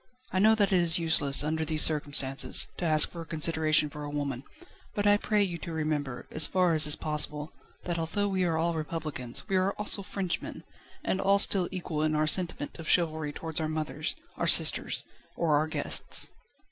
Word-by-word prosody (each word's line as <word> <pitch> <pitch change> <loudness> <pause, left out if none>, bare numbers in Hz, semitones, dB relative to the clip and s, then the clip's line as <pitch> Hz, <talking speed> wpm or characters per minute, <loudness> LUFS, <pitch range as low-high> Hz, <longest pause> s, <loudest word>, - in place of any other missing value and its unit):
I 185 - 0
know 220 +3 +5
that 205 -2 +1
it 185 - +4
is 170 +1 +3
useless, 150 -5 +1
under 160 +1 -1
these 155 0 +3
circumstances, 145 -3 0
to 175 - -3
ask 155 -2 +5
for 170 -1 -7
consideration 155 -1 +2
for 150 0 -9
a 145 - -5
woman, 140 -3 -4 0.5
but 205 -2 -1
I 205 0 +6
pray 210 0 +1
you 175 -3 -3
to 170 - -7
remember, 150 -5 -3
as 155 -1 +4
far 180 -2 +2
as 155 -1 +2
is 150 - +3
possible, 150 0 -1 0.3
that 175 -1 -3
although 185 +5 -1
we 190 -2 0
are 165 -2 0
all 170 +1 0
Republicans, 155 - -3
we 195 -2 +1
are 185 +2 +1
also 210 -1 -1
Frenchmen, 190 -2 -4 0.4
and 190 - -1
all 195 +1 +3
still 195 -2 +2
equal 175 -5 -4
in 155 0 +1
our 155 0 +2
sentiment 170 -2 0
of 160 - -6
chivalry 155 -3 +1
towards 160 +1 -4
our 155 - -2
mothers, 155 -1 -3 0.2
our - - -1
sisters, - - +2 0.3
or 160 -3 +1
our 155 +2 +1
guests." 160 - +2
160 Hz, 195 wpm, -28 LUFS, 150-180 Hz, 0.5 s, I